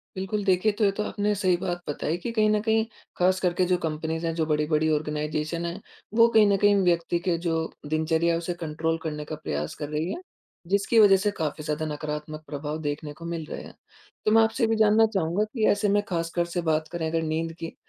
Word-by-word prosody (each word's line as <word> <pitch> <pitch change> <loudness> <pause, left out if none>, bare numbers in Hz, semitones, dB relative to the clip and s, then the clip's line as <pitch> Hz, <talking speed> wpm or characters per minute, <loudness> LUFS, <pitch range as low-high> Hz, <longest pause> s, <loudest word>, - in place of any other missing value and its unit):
बिल्कुल। 195 +2 -2
देखिए, 190 +3 +3
तो 205 +1 -2
ये 200 - +4
तो 205 +2 -3
आपने 210 0 -1
सही 185 -3 +3
बात 175 0 -3
बताई 150 +3 -2
कि 240 - -2
कहीं 215 0 +4
न - - +2
कहीं 220 0 +2 0.3
ख़ास 185 +1 +3
करके 180 0 +1
जो 180 0 +2
कंपनीज़ 160 +1 -3
हैं 165 - -1
जो 160 -1 0
बड़ी-बड़ी 155 0 +1
ऑर्गनाइज़ेशन 150 +2 -2
है 170 +3 -4 0.4
वो 230 - +8
कहीं 215 -1 +7
न 200 -1 +3
कहीं 205 0 +6
व्यक्ति 170 0 +1
के 170 -2 +2
जो 165 - +1 0.4
दिनचर्या 160 +2 +2
है 165 - +1
उसे 170 +1 -3
कंट्रोल 160 +1 -1
करने 150 -2 -4
का 155 - -5
प्रयास 75 +1 -3
कर 145 - -3
रही 155 +4 -2
है 350 - -6 0.5
जिसकी 200 +3 +3
वज़ह 200 -2 +7
से 205 +2 0
काफ़ी 150 -1 -3
ज़्यादा 150 +1 -2
नकारात्मक 150 +1 -5
प्रभाव 145 +1 -4
देखने 145 0 -4
को 170 - -8
मिल 170 -2 -4
रहे - - -5
हैं। - - -11 0.5
तो 215 - +3
मैं 225 +1 +6
आपसे 220 +3 0
ये - - +5
भी 225 - +2
जानना 215 +1 +5
चाहूँगा 180 +2 +1
कि 220 -4 +1
ऐसे 205 0 +1
में 205 - +4
ख़ासकर 170 -1 -1
से 175 - +1
बात 155 0 +1
करें 170 -2 -2
अगर 165 0 0
नींद 165 +1 -1
की, 165 - -6
170 Hz, 230 wpm, -26 LUFS, 155-200 Hz, 0.5 s, वो